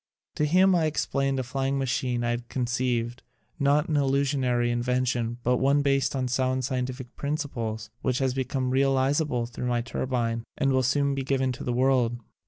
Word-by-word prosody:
To 150 - 0
him 185 +5 +4
I 170 -3 +3
explained 135 -3 0
a - - -1
flying 135 +2 -1
machine 125 -2 -1
I 120 - +1
had 120 0 -4
conceived, 120 -1 -1 0.4
not 145 +3 +3
an 155 - -2
illu 140 -1 +2
sionary 125 -4 +1
invention, 120 -1 0
but 125 +1 +2
one 140 +2 +3
based 135 -1 +1
on 130 -1 0
sound, 130 +1 0
scientific 130 -1 -4
principles, 115 -7 -3
which 125 - 0
has 130 -1 +1
become 130 0 -1
real 135 +1 +3
izable 135 -2 +1
thru 125 +1 -5
my 120 -1 +1
turbine 120 -2 -2
and 135 - +2
will 130 - +3
soon 140 +2 +1
be 135 - -2
given 130 -1 0
to 125 - -6
the 125 - -1
world. 125 -1 +2
130 Hz, 185 wpm, -26 LUFS, 120-140 Hz, 0.4 s, him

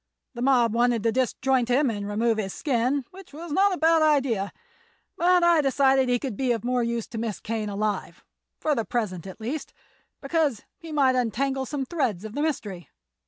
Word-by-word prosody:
The 240 - -7
mob 245 -4 +3
wanted 240 -2 +2
to 230 - +2
disjoint 260 0 +1
him 260 +1 +3
and 205 -2 -4
remove 220 +2 +1
his 195 -3 -3
skin, 260 0 0
which 380 -4 -14
was 330 +2 -8
not 395 +6 +3
a 365 - -1
bad 325 0 +4
idea; 265 -10 +2 0.6
but 355 0 +3
I 340 -2 +5
decided 270 -1 +3
he 245 - +3
could 250 -3 -5
be 255 +2 0
of 230 - -4
more 250 0 +1
use 235 -1 -1
to 225 - -5
Miss 225 -3 -3
Kane 220 -1 -3
alive—for 210 +8 -4
the 230 - 0
present, 195 -7 -3
at 190 - -10
least—because 275 +2 -4 0.2
he 330 -1 -9
might 275 -4 +3
untangle 265 +3 -1
some 275 -1 -3
threads 250 - -2
of 215 - -7
the 290 - -2
mystery. 210 - -3
250 Hz, 185 wpm, -25 LUFS, 225-290 Hz, 0.6 s, I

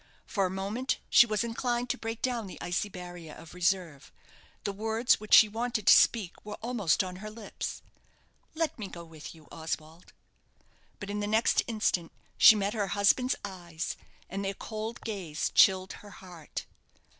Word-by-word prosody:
For 195 -2 0
a - - -5
moment 200 +7 -2
she 235 - +8
was 215 0 0
inclined 240 +1 -1
to - - -3
break 225 0 -5
down 240 -5 -1
the 185 - -10
icy 175 +4 -2
barrier 175 -4 -9
of 165 - -12
reserve. 175 -5 -1 0.5
The 200 - -2
words 220 +4 +2
which 215 0 +5
she 220 - +9
wanted 225 0 -2
to 205 - +9
speak 210 -7 +3
were 210 0 -6
almost 220 -7 0
on 180 -1 -6
her 215 +3 -7
lips, 215 -1 -6 0.7
"Let 320 -5 -1
me 205 - -4
go 170 -2 -9
with 160 0 -11
you, 155 -2 -18
Oswald." 160 +1 -6 0.9
But 200 0 -6
in 205 - -2
the 205 - -2
next 220 +2 +3
instant 210 -7 0 0.2
she 220 - +9
met 205 0 -1
her 205 -3 -1
husband's 250 +6 +3
eyes, 175 -4 -5 0.3
and 195 +1 -4
their 195 0 -2
cold 220 +3 -6
gaze 180 -8 -3
chilled 190 -1 +4
her 205 - -12
heart. 180 -6 -9
200 Hz, 170 wpm, -29 LUFS, 180-220 Hz, 0.9 s, she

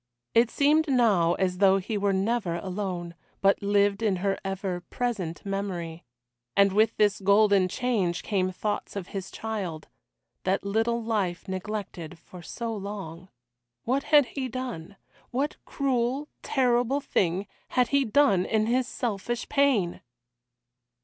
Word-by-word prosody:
It 230 0 +5
seemed 305 +4 +3
now 210 - +3
as 180 -1 -1
though 195 -1 +5
he 195 +3 -3
were 200 -1 +1
never 195 -2 0
alone, 180 -1 -4 0.3
but 195 0 +3
lived 200 0 +2
in 210 -4 +2
her 195 +2 0
ever 195 -2 -3
present 205 -10 -3
memory. 180 -5 -4 0.5
And 200 -1 +5
with 220 +2 +3
this 210 -1 +3
golden 200 -1 +4
change 200 -6 -1
came 185 -3 0
thoughts 205 +3 -3
of 190 -3 -5
his 195 -1 -5
child 195 -8 -5 0.5
that 190 +1 0
little 225 +3 0
life 200 -6 -1
neglected 190 -3 -5
for 175 +2 -13
so 230 +5 -5
long. 190 -4 -7 0.5
What 265 +4 0
had 295 -2 +6
he 260 +1 -4
done? 240 -8 -6 0.3
What 275 +4 -1
cruel, 265 +1 -1
terrible 250 0 +2
thing 190 -7 0 0.2
had 250 -1 +1
he 280 -1 +3
done 225 -6 +3
in 215 -1 +1
his 250 +2 +1
selfish 240 0 -3
pain? 270 -11 +2
205 Hz, 135 wpm, -27 LUFS, 185-240 Hz, 0.5 s, had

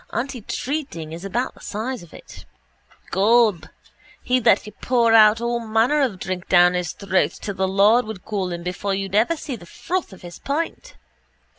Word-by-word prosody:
Antitreating 250 - -4
is 170 +2 -8
about 235 +7 -2
the - - -19
size 230 +5 -4
of 170 -2 -15
it. - - -13 0.7
Gob, 205 -4 +3 0.6
he'd 250 -1 +1
let - - +4
you 210 - -9
pour 235 -2 +2
all 225 +2 +5
manner 230 +6 +1
of 245 -9 0
drink 185 0 -5
down 175 0 +6
his 180 -1 -2
throat 190 0 0
till 200 - -5
the 190 0 -1
Lord 205 +6 +4
would 215 -4 -8
call 195 -4 -2
him 170 0 -5
before 195 +2 -2
you'd 195 -1 -4
ever 235 +11 +2
see 280 -3 -5
the 175 -6 -13
froth 365 - -4
of 190 - -14
his 175 -1 -10
pint. 330 - -4
215 Hz, 175 wpm, -22 LUFS, 185-245 Hz, 0.7 s, down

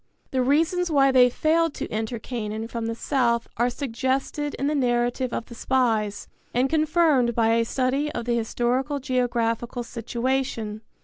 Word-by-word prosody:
The 260 - +1
reasons 325 +7 +2
why 275 -3 +4
they 250 -1 +6
failed 320 +4 +1
to - - -4
enter 220 +2 -3
Canaan 220 -1 -4
from 230 -1 -4
the 230 - -2
south 235 -2 0
are 240 +2 +2
suggested 270 +3 -2
in 275 - -3
the 295 - +1
narrative 245 -1 0
of 230 - -3
the - - -11
spies 225 -5 0 0.3
and 250 +2 +3
confirmed 310 -6 +3
by 225 -1 +3
a 230 0 +3
study 270 +5 0
of 235 - -4
the 240 - 0
historical 245 +5 0
geographical 240 -2 -1
situation. 235 -2 -2
245 Hz, 160 wpm, -25 LUFS, 230-275 Hz, 0.3 s, they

